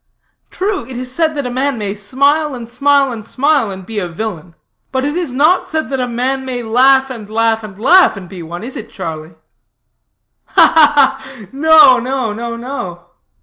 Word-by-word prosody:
True, 390 - -2
it 260 -2 -7
is 255 0 -6
said 320 +1 0
that 285 -2 -3
a 250 - -3
man 265 +1 -1
may 205 -2 -3
smile, 280 +8 0
and 235 -2 -8
smile, 275 +2 +2
and 225 -3 -7
smile, 275 +1 0
and 190 -1 -8
be 220 +1 -4
a 180 - -3
villain; 175 -2 -7 0.4
but 260 0 -1
it 290 +2 -2
is 345 -6 -2
not 305 +8 +2
said 315 -4 -3
that 270 -1 -2
a 250 - -1
man 255 +3 -2
may 250 -2 -4
laugh, 265 +4 +3
and 220 -5 -9
laugh, 225 0 +1
and 200 -3 -10
laugh, 340 - +5
and 190 -2 -9
be 185 -1 -10
one, 170 +4 -8
is 255 +3 -5
it, 225 - -7
Charlie?" 160 -3 -7 1.1
"Ha, - - +4
ha, 295 -3 +4
ha! 265 -5 -12
no 290 -2 +6
no, 255 -3 -2
no 235 +2 -5
no." 230 -9 -7
250 Hz, 195 wpm, -15 LUFS, 215-280 Hz, 1.1 s, no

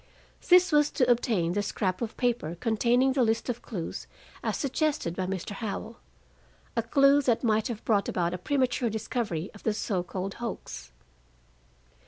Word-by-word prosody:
This 360 0 +7
was 295 -1 +4
to 250 - +2
obtain 220 -8 +1
the 205 +3 0
scrap 190 -1 -2
of 230 -2 -4
paper 235 -10 -1
containing 240 +3 +2
the 270 - +1
list 225 +1 +1
of 240 -1 -3
clues 180 -8 -6 0.4
as - - -1
suggested 280 - -1
by 185 0 -2
Mr. 190 +1 -4
Howell, 220 +2 -5 0.8
a 230 - +2
clue 275 +5 +4
that 245 -3 +1
might 220 -1 +2
have 235 -3 -6
brought 205 -3 +2
about 175 -1 0
a 180 - -4
premature 255 +1 0
discovery 210 -5 -3
of 205 - -13
the 220 - 0
so 195 -4 -1
called 185 +2 -4
hoax. 65 - -6
225 Hz, 165 wpm, -28 LUFS, 195-250 Hz, 0.8 s, This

